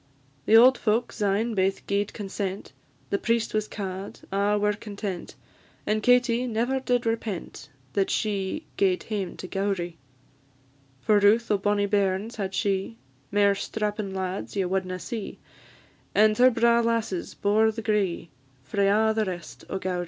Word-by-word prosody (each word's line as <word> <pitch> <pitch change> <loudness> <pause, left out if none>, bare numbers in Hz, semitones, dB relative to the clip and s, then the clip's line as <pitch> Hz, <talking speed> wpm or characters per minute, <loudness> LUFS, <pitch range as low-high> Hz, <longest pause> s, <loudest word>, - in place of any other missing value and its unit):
The 220 - +6
auld 250 +2 +7
folk 225 +2 +1
syne 210 +3 0
baith 195 -1 0
gi'ed 200 0 0
consent; 195 -1 -5 0.4
The 200 - +1
priest 230 0 0
was 215 0 0
ca'd: 195 -1 -6
a' 200 +1 +2
were 210 0 +2
content; 205 -3 -6 0.5
And 215 0 0
Katie 245 +1 +3
never 240 +3 0
did 245 -2 0
repent 220 -9 -4 0.2
That 195 -1 +1
she 205 +7 -1
gaed 185 -2 +2
hame 200 -5 -4
to 185 - -7
Gowrie. 185 -4 -2 1.0
For 210 +5 +4
routh 215 +3 +4
o' 205 - +4
bonnie 205 0 +1
bairns 200 +2 0
had 195 -2 -3
she; 195 - -1 0.3
Mair 200 0 +4
strappin' 210 0 -3
lads 190 +1 -4
ye 195 -2 +1
wadna 185 0 -2
see; 215 +3 -6 0.8
And 215 +1 +5
her 255 +1 +8
braw 235 -1 +3
lasses 230 -6 -1
bore 215 +2 +3
the 225 +1 -7
gree 200 -6 0 0.3
Frae 200 +7 +1
a' 220 +2 +3
the 220 -1 0
rest 175 -4 -7
o' - - -2
Gowrie. 185 -1 -2
205 Hz, 150 wpm, -26 LUFS, 195-220 Hz, 1.0 s, her